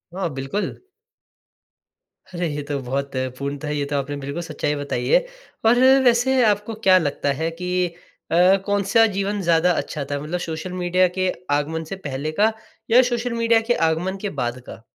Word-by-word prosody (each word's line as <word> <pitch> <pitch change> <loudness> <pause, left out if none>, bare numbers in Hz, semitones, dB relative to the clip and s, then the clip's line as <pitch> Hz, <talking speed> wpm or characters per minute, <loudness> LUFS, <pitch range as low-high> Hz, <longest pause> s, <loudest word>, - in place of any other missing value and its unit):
हाँ, 185 -3 -1
बिल्कुल। 135 +9 -3 1.6
अरे! 175 -1 -1
ये 145 - -3
तो 145 - -1
बहुत 140 +3 -3 0.3
पूर्णतः 140 +1 -4
ये 145 -1 -1
तो - - 0
आपने 140 +1 -3
बिल्कुल 140 +5 -4
सच्चाई 150 -2 -2
बताई 145 0 -3
है। - - +5 0.4
पर 235 +2 +5 0.2
वैसे 250 +1 +3
आपको 210 +1 +1
क्या 185 0 +8
लगता 145 -3 0
है 160 +4 -2
कि 180 0 0 0.4
अ, - - +2 0.3
कौन-सा 205 +2 +3
जीवन 200 0 -2
ज़्यादा 170 0 +3
अच्छा 150 -3 -3
था 145 +1 -3
मतलब 170 +4 -3
सोशल 165 +3 -5
मीडिया 180 +1 +3
के 185 -1 +1 0.2
आगमन 160 +3 -2
से - - -2
पहले 150 -3 -4
का, 220 +1 +5 0.4
या 250 +2 +8
सोशल 240 0 -1
मीडिया 230 -1 +3
के - - +6 0.2
आगमन 180 +4 -2
के 205 - -2
बाद 120 +1 -3
का? 115 - -10
175 Hz, 170 wpm, -22 LUFS, 145-205 Hz, 1.6 s, क्या